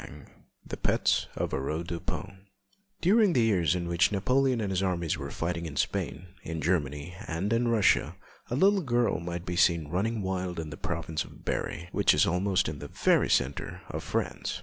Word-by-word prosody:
_] 70 +4 -11 0.4
THE - - -6
PETS - - +1
OF - - -2
AURORE 75 +5 -2
DUPIN 95 +3 -6 0.5
During 200 +1 +4
the 120 - +3
years 90 -8 +2
in 85 -1 -2
which 85 +4 +3
Napoleon 130 +5 +2
and 100 -3 -2
his 95 0 0
armies 85 -4 0
were - - -6
fighting 85 0 -3
in 70 - -8
Spain, 90 - -2
in 80 -4 -5
Germany, 75 -1 -1
and 95 +7 -1
in 120 +1 +2
Russia, 115 -4 +3 0.3
a 120 - -1
little 195 +6 +4
girl 120 - +1
might 85 +1 -5
be 90 - -3
seen 85 -4 +3
running 105 +5 -1
wild 95 -2 -2
in 80 -2 -5
the - - -6
province 80 0 -3
of - - -15
Berry, 85 - -2
which - - +4
is - - +4
almost 90 +2 +1
in 75 -1 -5
the 75 - -7
very - - +2
centre 70 +1 0
of - - -4
France. - - -2
90 Hz, 190 wpm, -29 LUFS, 80-105 Hz, 0.5 s, During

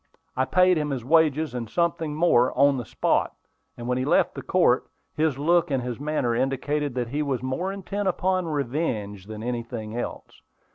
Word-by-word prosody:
I 130 - +1
paid 180 +2 +4
him 150 -1 -2
his 130 -4 -3
wages, 155 -1 +3
and 120 -3 -4
something 165 -1 -1
more, 130 -7 +3
on 140 0 +5
the 120 - -4
spot; - - 0 0.4
and 120 - -6
when 125 0 0
he - - 0
left 150 +6 +2
the - - -6
court, 170 -9 +2 0.3
his 155 -3 +1
look 170 +4 +2
and 135 -3 0
his 125 0 -4
manner 145 -5 0
indicated 135 +3 -1
that 120 -2 -2
he 145 +4 -1
was 135 -4 -2
more 130 +9 -2
intent 195 +1 -4
upon 185 -1 0
revenge 120 - -2
than 110 0 -7
anything 115 -2 -4
else. 120 - -6
140 Hz, 185 wpm, -25 LUFS, 125-160 Hz, 0.4 s, on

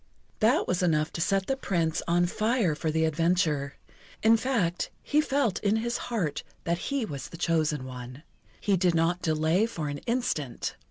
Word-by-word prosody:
That 225 +3 +3
was 180 0 0
enough 155 -3 +1
to 165 - -3
set 195 +2 +1
the 270 - 0
Prince 170 -10 0
on 175 +1 +3
fire 215 -1 +1
for 155 +1 -2
the 160 +1 +2
adventure. 160 -3 +1 0.5
In 225 +1 +7
fact, 220 -8 0
he 300 +1 +3
felt 270 -9 0
in 210 0 +2
his 235 +2 -1
heart 180 -12 -1 0.2
that 170 0 0
he 275 -4 0
was 140 -8 -6
the 170 - -9
chosen 155 -5 0
one. 125 +2 -8 0.4
He 200 -2 +2
did 180 -1 +2
not 170 +2 +1
delay 160 +5 +2
for 160 -10 -4
an 145 0 -4
instant. 230 - -1
175 Hz, 175 wpm, -28 LUFS, 155-220 Hz, 0.5 s, In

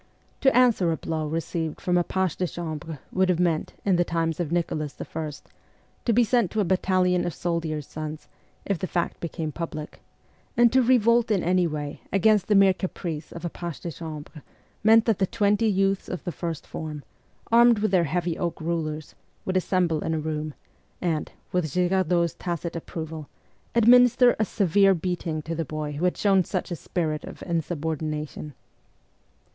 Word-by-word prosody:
To 265 -3 +4
answer 230 -9 +4
a 160 - -1
blow 155 0 -3
received 160 0 -3
from 180 - 0
a 175 - +4
page 190 -2 -1
de 180 - -1
chambre 160 -2 -5
would 190 0 +2
have 175 -2 +2
meant, 170 -3 0
in 190 -3 +3
the 175 - +4
times 165 -1 -1
of 170 -3 -2
Nicholas 155 -4 -2
I., 155 -2 -4 0.7
to 235 - +3
be 240 +2 +5
sent 235 -4 +2
to 220 - -2
a - - +4
battalion 185 -1 +2
of 175 - -3
soldiers' 165 -4 -2
sons, 155 0 -7 0.4
if 195 -4 -1
the 185 - -2
fact 175 -1 -2
became 165 -2 -4
public; 155 -1 -6 0.6
and 240 0 +5
to 260 - +6
revolt 235 -1 +4
in 200 -5 +1
any 180 0 +3
way 150 -2 -5
against 200 0 +3
the 210 - +3
mere 195 -1 +6
caprice 170 -4 -5
of 170 0 -7
a - - -1
page 170 -3 -6
de 170 - -4
chambre 155 -1 -8 0.4
meant 225 +1 +6
that 225 -4 +1
the 190 - +2
twenty 210 +1 +2
youths 195 -1 +1
of 180 - -5
the 175 - -3
first 165 -3 -5
form, 150 -2 -6 0.5
armed 235 0 +6
with 210 -1 0
their 180 -3 +4
heavy 170 +2 -1
oak 175 -2 -2
rulers, 155 -2 -3 0.3
would 185 - -2
assemble 180 -4 +1
in 160 - -1
a - - -1
room, 155 -1 -3 0.4
and, 165 -4 -1 0.2
with 180 -2 +1
Girar 180 +2 +1
dot's 170 -1 +2
tacit 170 -1 -4
approval, 160 -2 -6 0.5
administer 245 +1 +6
a 215 - +3
severe 195 0 +3
beating 165 -3 -3
to 165 - -4
the 165 0 -2
boy 155 0 -4
who 150 +5 -2
had 180 - +1
shown 195 -2 +4
such 185 0 -3
a - - -1
spirit 155 -1 -2
of - - -9
insubordina 160 -2 -2
tion. 150 0 -9
175 Hz, 185 wpm, -25 LUFS, 160-195 Hz, 0.7 s, to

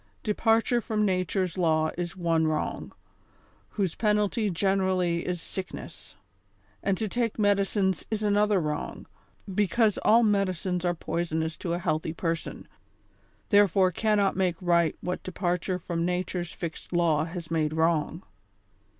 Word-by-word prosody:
Departure 225 +2 +2
from 215 -1 0
nature's 185 -1 0
law 155 -2 +2
is 175 +1 -4
one 165 -2 +1
wrong, 155 0 -2 0.8
whose 190 -6 -1
penalty 210 0 +1
generally 185 -2 +1
is 180 -1 -2
sick 185 +2 -6
ness; - - -11 0.7
and 195 -1 0
to 220 - -1
take 230 +1 -1
medicines 200 -2 +1
is 215 -1 -2
another 210 -1 +3
wrong, 150 -2 -4 0.5
because 210 +2 +2
all 230 +2 +5
medicines 185 -4 0
are 175 -1 +1
poisonous 160 -1 -2
to 170 - -3
a - - 0
healthy 160 -3 -1
person, 165 -1 -3 0.8
therefore 195 -3 +4
cannot 205 0 +1
make 185 -2 +1
right 170 -3 +2
what 180 0 -3
departure 180 0 -2
from 170 -1 -3
nature's 180 0 -2
fixed 165 -2 -7
law 165 -3 +2
has 170 -1 -7
made 155 -2 +1
wrong. 160 +1 0
180 Hz, 135 wpm, -27 LUFS, 170-205 Hz, 0.8 s, all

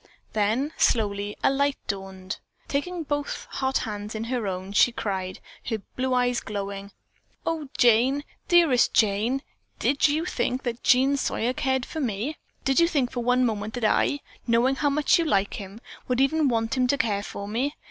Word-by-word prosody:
Then, 225 +8 +1
slowly 205 -2 +1
a - - +5
light 280 +1 +1
dawned. 190 -1 -5 0.3
Taking 335 +5 -2
both 290 -1 -3
hot 265 0 0
hands 210 -1 -5
in 220 - -3
her 235 -2 -2
own, 185 +1 -4
she 245 - +5
cried, 190 -5 -3 0.3
her 225 - -1 0.2
blue 255 0 0
eyes 245 -1 +2
glowing, 200 -1 -5 0.5
"Oh, 315 -4 -2
Jane, 245 +4 +4 0.2
dearest 335 -8 +4
Jane, 220 +6 +2 0.3
did 280 +2 +3
you 310 +3 0
think 255 -5 -1
that 240 -1 -3
Jean 265 +3 +4
Sawyer 250 -2 0
cared 265 -1 0
for 320 - -6
me? 245 +3 -2 0.3
Did 270 +1 +3
you 335 - +5
think 280 -7 0
for 245 - -3
one 250 +1 +3
moment 215 -1 -2
that 245 -3 -1
I, 285 +6 +2 0.3
knowing 240 +3 +3
how 290 - +2
much 295 +3 +3
you 335 - +1
liked 200 -9 +1
him, 200 +1 -8 0.3
would 250 0 0
even 290 +3 +3
want 225 0 0
him 255 -1 +2
to 280 - +2
care 205 -5 0
for 200 0 -7
me? 255 +8 -1
245 Hz, 180 wpm, -26 LUFS, 210-275 Hz, 0.5 s, a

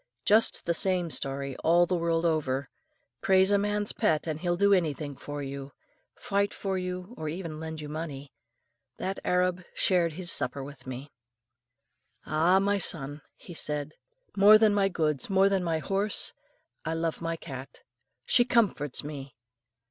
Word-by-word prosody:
Just 215 +2 +3
the 170 - +1
same 180 -1 +2
story 135 -1 -3
all 175 +2 +4
the 180 - -1
world 165 0 0
over, 140 -4 0 0.5
praise 190 +1 +4
a 200 - +4
man's 205 0 0
pet 155 -1 +1
and 155 -2 -3
he'll 175 -1 0
do 200 +1 +4
anything 150 -5 -1
for 145 +1 -6
you; 140 0 -7 0.4
fight 200 0 -1
for 195 -1 -3
you, 180 +3 -4
or 155 - -4
even 165 -2 -6
lend 160 -1 -6
you 150 - -6
money. 145 -3 -6 0.6
That 190 +1 -3
Arab 180 0 +1
shared 175 -4 +2
his 175 +1 -2
supper 135 +2 -2
with 140 -1 -11
me. 130 +3 -7 1.1
"Ah! 165 +5 +3
my 200 +1 +2
son," 145 -5 -1
he 175 - -12
said, 150 -2 -1 0.4
"more 205 +2 +8
than 215 -1 +4
my 200 -1 +2
goods, 155 -4 0
more 195 0 +4
than 195 -2 +1
my 165 -2 0
horse, 195 +5 +1 0.5
I 160 0 -2
love 165 0 -2
my 165 0 -2
cat. 135 -5 -9 0.4
She 240 - +4
comforts 210 - +1
me. 140 -4 -8
165 Hz, 160 wpm, -28 LUFS, 145-190 Hz, 1.1 s, more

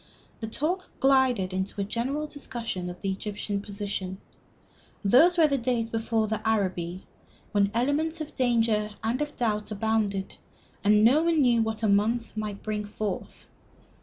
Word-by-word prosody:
The 220 - -4
talk 340 +11 -2
glided 260 -8 +3
into 190 +2 -2
a - - +1
general 245 +8 -2
discussion 235 -11 -5
of 180 - -9
the 195 - -1
Egyptian 205 +1 -3
position. 200 -2 -4 0.9
Those 315 - +6
were 325 - +6
the 280 -2 +1
days 230 -2 -1
before 225 -1 0 0.2
Arabi, 185 -5 -1 0.5
when 200 -1 +3
elements 290 +7 +1
of 310 -1 -6
danger 225 -4 +2
and 235 +5 0
of 295 0 -3
doubt 210 -3 0
abounded, 210 -2 -1 0.5
and 210 +1 +5
none 315 +6 +4
knew 240 -3 +4
what 220 0 -2
a - - +3
month 220 +4 +1
might 210 -2 -4
bring 210 -1 -2
forth. 205 -1 -5
220 Hz, 145 wpm, -27 LUFS, 205-255 Hz, 0.9 s, Those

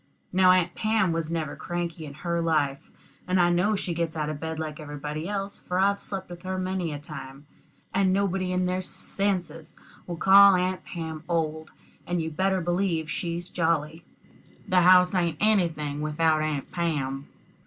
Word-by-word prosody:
Now 185 0 +5
Aunt 180 -1 +4
Pam 215 -4 +1
was 165 -1 -2
never 160 -3 -3
cranky 170 -2 -4
in 140 - -10
her 170 +2 -2
life; 150 -4 0 0.4
and 185 0 +2
I 175 0 +4
know 190 +5 +2
she 190 -3 -3
gets 165 -1 -2
out 150 -1 -1
of 150 - -6
bed 160 0 -4
like 155 -1 -5
everybody 150 +2 -5
else, 200 -1 -4
for 180 - -3
I've 200 +1 +3
slept 195 -2 -5
with 175 -1 -10
her 185 +1 -3
many 185 -2 -2
a 145 - -4
time. 140 -1 -10 0.5
And 190 -1 +3
nobody 190 -1 0
in 180 0 +1
their 185 +1 -1
senses 175 -5 -2 0.3
would 175 -1 -5
call 195 +2 +8
Aunt 185 +1 -1
Pam 160 -2 -6
old, 160 -2 -1 0.4
and 175 0 0
you'd 160 -1 -4
better 190 +1 +1
believe 175 -2 -1
she's 170 +1 -3
jolly. 160 -1 -1 0.6
The 185 -1 +4
house 180 +1 +6
ain't 170 -4 0
anything 165 -9 +1
without 155 +1 +1
Aunt 155 -3 -3
Pam. 145 -6 -2
170 Hz, 175 wpm, -26 LUFS, 155-185 Hz, 0.6 s, call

